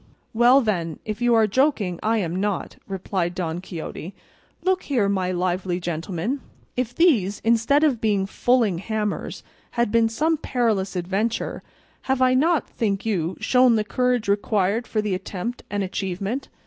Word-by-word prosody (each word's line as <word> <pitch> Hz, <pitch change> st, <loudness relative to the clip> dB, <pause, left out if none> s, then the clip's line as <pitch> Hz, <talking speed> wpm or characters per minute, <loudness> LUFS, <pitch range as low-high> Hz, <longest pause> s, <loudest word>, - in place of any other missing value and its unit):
"Well, 240 Hz, +4 st, +6 dB
then, 170 Hz, -, -1 dB
if 215 Hz, +2 st, -4 dB
you 240 Hz, -1 st, +4 dB
are 225 Hz, -1 st, +5 dB
joking 215 Hz, -, +1 dB
I 225 Hz, +1 st, +1 dB
am 175 Hz, -5 st, -2 dB
not," 200 Hz, -1 st, -2 dB
replied 185 Hz, -2 st, -2 dB
Don 175 Hz, -2 st, -3 dB
Quixote. 180 Hz, 0 st, -7 dB, 0.5 s
"Look 375 Hz, 0 st, +2 dB
here, 240 Hz, -8 st, +1 dB
my 190 Hz, -2 st, 0 dB
lively 180 Hz, 0 st, -1 dB
gentleman, 175 Hz, -, -3 dB, 0.3 s
if 245 Hz, -1 st, -2 dB
these, 225 Hz, -, +3 dB
instead 230 Hz, +6 st, +3 dB
of 270 Hz, -7 st, +2 dB
being 205 Hz, -3 st, +1 dB
fulling 220 Hz, -3 st, +1 dB
hammers, 210 Hz, +1 st, -3 dB, 0.3 s
had 235 Hz, -3 st, +2 dB
been 230 Hz, 0 st, +3 dB
some 315 Hz, +8 st, +1 dB
perilous 220 Hz, -9 st, 0 dB
adventure, 195 Hz, +6 st, -2 dB, 0.5 s
have 265 Hz, 0 st, +2 dB
I 255 Hz, 0 st, +4 dB
not, 315 Hz, +4 st, +2 dB
think 205 Hz, -3 st, -2 dB
you, 180 Hz, -5 st, -1 dB
shown 250 Hz, -2 st, +4 dB
the 215 Hz, -, +1 dB
courage 250 Hz, 0 st, 0 dB
required 205 Hz, +2 st, +1 dB
for 215 Hz, -1 st, -1 dB
the 210 Hz, -2 st, -1 dB
attempt 195 Hz, +5 st, -4 dB
and 205 Hz, -1 st, -1 dB
achievement? 195 Hz, +6 st, -3 dB
210 Hz, 155 wpm, -23 LUFS, 185-245 Hz, 0.5 s, Well